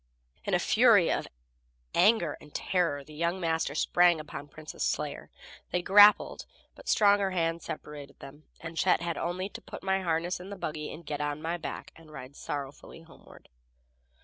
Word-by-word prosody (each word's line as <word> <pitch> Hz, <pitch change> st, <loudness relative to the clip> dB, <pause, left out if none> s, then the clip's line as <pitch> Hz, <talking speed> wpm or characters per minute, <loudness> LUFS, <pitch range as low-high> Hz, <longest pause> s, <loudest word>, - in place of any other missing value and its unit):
In -, -, +1 dB
a -, -, +2 dB
fury -, -, +5 dB
of -, -, -1 dB, 0.7 s
anger 180 Hz, -5 st, +3 dB
and 150 Hz, -, -15 dB
terror 170 Hz, -7 st, 0 dB
the 155 Hz, -, -15 dB
young 170 Hz, +4 st, -1 dB
master 160 Hz, -4 st, -1 dB
sprang 175 Hz, +1 st, +3 dB
upon 150 Hz, -1 st, -8 dB
Prince's 155 Hz, +2 st, -10 dB
slayer. -, -, -2 dB, 0.4 s
They 180 Hz, -, -1 dB
grappled, 205 Hz, +3 st, +6 dB, 0.3 s
but -, -, -10 dB
strong 205 Hz, -1 st, +5 dB
hands 170 Hz, -4 st, -1 dB
separated 145 Hz, -2 st, -8 dB
them, 145 Hz, +3 st, -13 dB
and 165 Hz, 0 st, -8 dB
Chet 180 Hz, +2 st, +2 dB
had 170 Hz, -1 st, -2 dB
only 180 Hz, +2 st, -2 dB
to -, -, -10 dB
put -, -, -10 dB
my 190 Hz, 0 st, +1 dB
harness 170 Hz, 0 st, -1 dB
in 185 Hz, +2 st, -10 dB
the 200 Hz, -, -6 dB
buggy, 155 Hz, -3 st, -5 dB
get 150 Hz, 0 st, -4 dB
on 145 Hz, 0 st, -2 dB
my 165 Hz, +2 st, -3 dB
back 165 Hz, -, -7 dB
and 160 Hz, -2 st, -16 dB
ride 135 Hz, -2 st, -10 dB
sorrowfully 145 Hz, +3 st, -7 dB
homeward. 165 Hz, 0 st, -17 dB
165 Hz, 170 wpm, -29 LUFS, 150-180 Hz, 0.7 s, grappled